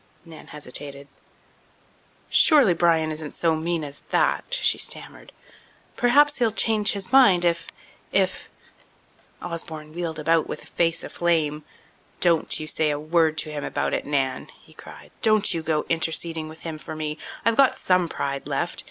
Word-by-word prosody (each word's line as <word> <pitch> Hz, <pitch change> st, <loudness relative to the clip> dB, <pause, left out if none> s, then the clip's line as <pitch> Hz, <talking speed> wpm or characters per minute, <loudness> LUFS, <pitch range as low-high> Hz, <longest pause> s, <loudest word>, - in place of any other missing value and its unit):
Nan 160 Hz, -2 st, -13 dB
hesitated. 140 Hz, -1 st, -6 dB, 1.2 s
"Surely 280 Hz, -, +5 dB
Bryan 165 Hz, -2 st, +2 dB
isn't 155 Hz, -1 st, -6 dB
so 165 Hz, -2 st, +1 dB
mean 165 Hz, 0 st, -2 dB
as 140 Hz, -1 st, -6 dB
that," -, -, 0 dB
she -, -, +1 dB
stammered. -, -, -3 dB, 0.6 s
"Perhaps 290 Hz, +4 st, +4 dB
he'll 235 Hz, -2 st, +3 dB
change 215 Hz, -1 st, +2 dB
his 200 Hz, +1 st, -3 dB
mind 205 Hz, -10 st, +5 dB
if—if—" 170 Hz, -1 st, -2 dB, 0.9 s
Osborne 160 Hz, -3 st, -7 dB
wheeled 165 Hz, -2 st, -4 dB
about 160 Hz, +1 st, +1 dB
with -, -, -8 dB
face 165 Hz, -1 st, 0 dB
aflame. 155 Hz, -3 st, -1 dB, 0.6 s
"Don't 170 Hz, -3 st, +2 dB
you 155 Hz, -, -5 dB
say 155 Hz, 0 st, 0 dB
a 145 Hz, -, -1 dB
word 160 Hz, +1 st, +1 dB
to 155 Hz, 0 st, -2 dB
him 145 Hz, -1 st, -5 dB
about -, -, -2 dB
it, -, -, -2 dB
Nan!" 135 Hz, -3 st, -1 dB
he -, -, -20 dB
cried. -, -, -13 dB
"Don't 215 Hz, -3 st, +4 dB
you 165 Hz, -, -2 dB
go 155 Hz, -1 st, -1 dB
interceding 165 Hz, -1 st, -1 dB
with 160 Hz, +1 st, -13 dB
him 160 Hz, -2 st, -6 dB
for 155 Hz, -, -8 dB
me. 155 Hz, 0 st, -4 dB, 0.3 s
I've 230 Hz, 0 st, +3 dB
got 270 Hz, +2 st, +4 dB
some 180 Hz, -2 st, +1 dB
pride 140 Hz, -2 st, -4 dB
left. -, -, -3 dB
165 Hz, 150 wpm, -24 LUFS, 155-175 Hz, 1.2 s, Surely